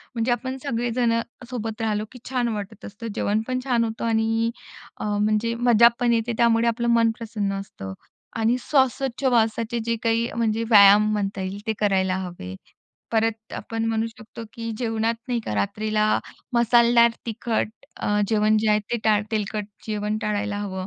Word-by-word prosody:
म्हणजे 230 +1 0
आपण 260 +2 -2
सगळेजणं 235 -2 0 0.3
सोबत 225 -2 -4
राहिलो, 215 -1 -1
की 250 - -12
छान 250 -2 0
वाटत 205 +1 -7
असतं. 210 +3 -8
जेवणपण 220 +5 -1
छान 245 -3 +2
होतं 225 0 -3
आणि 225 0 +1 0.5
अ, - - -6
म्हणजे 215 +2 +1
मजापण 235 0 +4
येते. 230 +1 0
त्यामुळे 235 0 +3
आपलं 235 +1 0
मन 230 -1 +4
प्रसन्न 215 -4 -3
असतं. 95 - -8 0.4
आणि 225 +2 +2
श्वासोछावास 260 -4 +1 0.3
जे 230 0 0
काही 230 0 +1
म्हणजे 225 -1 0
व्यायाम 210 0 +7
म्हणता 200 -2 -2
येईल 190 +2 -4
ते 220 - +1
करायला 190 -3 +2
हवे. 175 - -6 0.6
परत 225 0 -1
आपण 225 +1 -4
म्हणू 225 0 0
शकतो, 230 0 -11
की 230 0 -5
जेवणात 225 -1 0
नाही 245 -1 0
का 105 - -3
रात्रीला 215 - 0 0.5
मसालेदार 235 0 +5 0.2
तिखट 225 -1 -1 0.3
अ, - - -4 0.2
जेवण 215 -1 +3
जे 215 0 0
आहे 210 - +4
ते 240 - +1
टाळ 210 -1 +3
तेलकट 210 -1 -2 0.2
जेवण 210 0 -2
टाळायला 210 -1 -2
हवं. 190 -2 -4
225 Hz, 155 wpm, -24 LUFS, 210-235 Hz, 0.6 s, व्यायाम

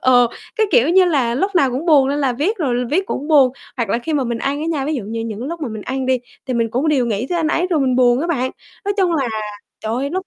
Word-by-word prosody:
ờ, 245 -1 +5 0.3
cái, 440 -2 +3
kiểu 250 -3 +4
như 370 +2 +5
là, 270 -9 +1
lúc 390 +10 -1
nào 275 -7 +3
cũng 265 +7 -3
buồn 285 -5 +5
nên 285 +1 0
là 270 -3 +1
viết 315 - -1
rồi 250 - 0
viết 375 +6 +1
cũng 290 +4 -4
buồn, 280 -5 +6 0.3
hoặc 235 -3 -1
là 230 - +1
khi 310 +6 -4
mà 280 -3 +1
mình 235 -1 -2
ăn 280 +4 -2
á 315 - -3
nha, 310 -5 -1
ví 305 +2 -1
dụ 250 - -3
như 225 +2 -4
những 225 +1 -5
lúc 335 +3 -5
mà 285 - -3
mình 215 -2 -6
ăn 265 +3 -3
đi 260 -1 +2 0.3
thì 255 - -2
mình 230 -1 +1
cũng 260 +7 0
đều 270 -5 +2
nghĩ 225 +2 -1
tới 350 - -1
anh 320 -2 +1
ấy 345 +3 +1
rồi 315 -4 +2
mình 255 -2 +1
buồn 245 0 +4
á 335 - -1
bạn, 260 -6 -1 0.3
nói 405 0 0
chung 370 -4 +2
là 270 -6 0 0.5
trời 220 +1 -3
ơi 275 +4 -2
lúc 375 +2 -3
270 Hz, 305 wpm, -19 LUFS, 245-320 Hz, 0.5 s, buồn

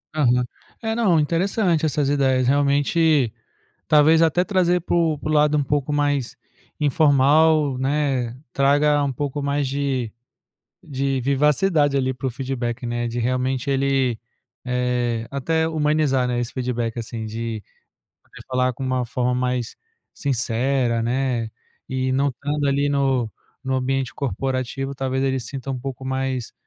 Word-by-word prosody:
Aham. 125 -4 +3 0.4
É, 225 0 -1
não, 205 -8 +3
interessante 170 +1 +1
essas 145 -1 0
ideias, 130 -3 +2
realmente, 145 -1 +2 0.5
talvez 155 +2 +5
até 170 +2 +3
,trazer 180 -3 +1
para 175 - -1
o 165 -3 +2
para 155 - -5
o - - +1
lado 150 0 +4
um 145 - +1
pouco 145 +1 -1
mais 145 -3 0 0.4
informal, 150 0 +3
né, 135 -3 0 0.2
traga 145 +1 +3
um 135 -2 -1
pouco 145 +2 -3
mais 140 -1 0
de 135 -4 -2 0.7
de 135 -4 -2
vivacidade 145 +3 +2
ali 130 -1 0
pro 130 +1 -3
feedback, 125 -1 -4
né, 120 0 -2
de 120 +1 -3
realmente, 130 +2 -1
ele, 135 -4 +1 0.4
eh, 125 -2 -1
até 160 +4 0
humanizar, 150 -4 +1
né, 120 -1 -1
esse 120 0 -4
feedback, 120 -3 -2
assim, 115 0 -6
de 110 0 -4 0.9
falar 130 -1 +1
com 135 - -7
uma 130 -1 0
forma 125 0 -1
mais 125 -1 -2 0.4
sincera, 125 -2 0
né, 120 -1 -1 0.4
e 130 0 -1
não 140 +2 +2
estando 145 +3 -2
ali 140 +1 +1
no 135 -5 +1 0.3
no 130 0 -1
ambiente 130 0 -1
corporativo, 135 +2 -3
talvez, 130 0 -2
ele 135 -1 0
sinta 135 +3 -6
um 130 - -4
pouco 135 0 -6
mais 130 -2 -2
135 Hz, 140 wpm, -22 LUFS, 125-145 Hz, 0.9 s, talvez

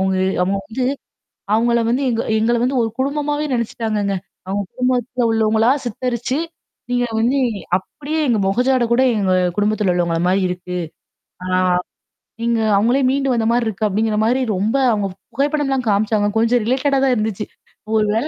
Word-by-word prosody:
அவுங்க 190 0 +1 0.3
அவங்க 195 +2 0
வந்து 250 +4 -3 0.7
அவங்கள 235 +1 +2
வந்து 255 +4 +1
எங்க 230 0 0 0.2
எங்கள 235 +2 +2
வந்து 260 +1 0
ஒரு 225 - -1
குடும்பமாவே 295 +2 -1
நெனைச்சுட்டாங்கங்க. 220 -4 -1 0.3
அவங்க 200 +2 -1
குடும்பத்துல 250 -1 0
உள்ளவங்களா 220 +1 +3 0.2
சித்தரிச்சு 245 +3 -2 0.5
நீங்க 245 0 +1
வந்து 255 +5 +2 0.4
அப்படியே 300 +10 -5
எங்க 230 -3 +2
மொகஜாட 250 +5 +2
கூட 255 +2 +4
எங்க 190 -3 +1 0.2
குடும்பத்துல 205 -2 +1
உள்ளவங்க 170 -1 0
அ - - +1
மாரி 190 +2 +2
இருக்கு. 180 0 -5 0.7
ஆ. - - -4 0.9
நீங்க 235 -1 +1 0.2
அவங்களே 240 +6 +2
மீண்டு 270 0 +1
வந்த 230 -2 0
மாரி 240 0 +1
இருக்கு. 215 0 -2
அப்படிங்கிற 215 +2 0
மாரி 250 +4 +2
ரொம்ப 210 +6 0 0.2
அவங்க 205 -2 -1 0.3
புகைப்படம்லாம் 275 -2 0
காமிச்சாங்க. 205 0 +2
கொஞ்சம் 230 +2 +3
ரிலேட்டடா 270 +3 +1
தான் 265 -2 +3
இருந்துச்சு. 215 -2 -2 0.5
ஒரு 215 - +3
வேளை 235 +7 0
230 Hz, 150 wpm, -19 LUFS, 210-255 Hz, 0.9 s, கூட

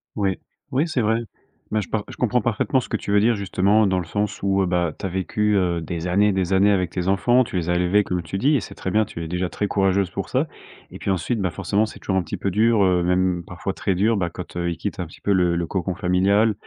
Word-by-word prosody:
Ouais, 100 -3 0 0.3
oui, 145 +6 +1
c'est 135 -6 0
vrai. 110 +2 +1 0.5
Mais 110 0 +1
je - - -8
pars 110 -2 -1
je - - -10
comprends 125 0 +1
parfaitement 120 +3 +1
ce - - -6
que 110 - -1
tu 100 - -5
veux 105 - +5
dire, 115 +2 +3
justement 100 +2 +2
dans 95 - +1
le 90 - -2
sens 105 +3 -3
où, 95 0 +2
heu, 95 - +1
bah, 85 -3 0
tu - - -6
as - - -4
vécu, 105 +3 0
heu, 90 -3 +1
des 85 +1 -4
années, 100 +4 +3
des 95 0 0
années 100 +2 +5
avec 90 -4 +1
tes 90 0 -3
enfants, 120 +6 +3
tu 105 - -8
les 85 -1 -1
as - - +2
élevés 90 +4 +3
comme 90 -2 -2
tu 85 +4 -5
dis 145 +7 +3
et - - +3
c'est 95 - -9
très 95 - -4
bien. 110 +2 +3
Tu 85 - -7
es - - -5
déjà 90 +1 -2
très 105 - -2
courageuse 95 -2 +1
pour - - -4
ça - - +1 0.4
et - - -9
puis - - -3
ensuite, 95 +5 0
bah, 90 - +1
forcément 100 +5 0
c'est - - -10
toujours 95 -1 -1
un - - +3
petit - - -5
peu 100 - -2
dur, 110 +1 +3
heu, 90 -1 +3
même 90 0 +1
parfois 90 +3 -5
très 95 -3 -1
dur, 110 +4 +2
bah, 85 -3 -1
quand, 90 +1 -9
heu, 85 0 -1
ils 85 - -4
quittent - - -4
un 90 - -3
petit - - -16
peu 100 - +1
le 90 -2 +2
le 85 0 -1
cocon 95 -1 -2
familial. 100 +5 +2
95 Hz, 285 wpm, -22 LUFS, 90-105 Hz, 0.5 s, veux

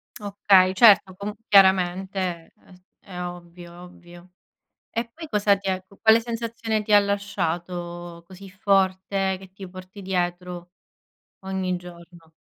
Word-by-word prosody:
Okay, 195 -2 +3
certo. 195 -3 +6
Comu 200 +2 -5
chiaramente 190 -1 +3 0.3
è - - -24
s 180 - -19 0.2
è 180 -3 -9
ovvio, 175 0 -9
ovvio. 175 0 -15 0.6
E 230 +1 -3
poi 320 -1 -10
cosa 205 -4 +2
ti 195 0 -6
ecco, 190 +1 -5
quale 220 +1 +5
sensazione 230 -1 -3
ti 210 0 -3
ha 205 - +9
lasciato 175 -3 -4
così 190 +2 -12
forte 190 0 0
che 190 -1 -15
ti 190 -1 -10
porti 185 +2 -12
dietro 180 -1 -3 0.7
ogni 190 -1 -2
giorno? 170 -2 -14
190 Hz, 130 wpm, -24 LUFS, 175-200 Hz, 0.7 s, ha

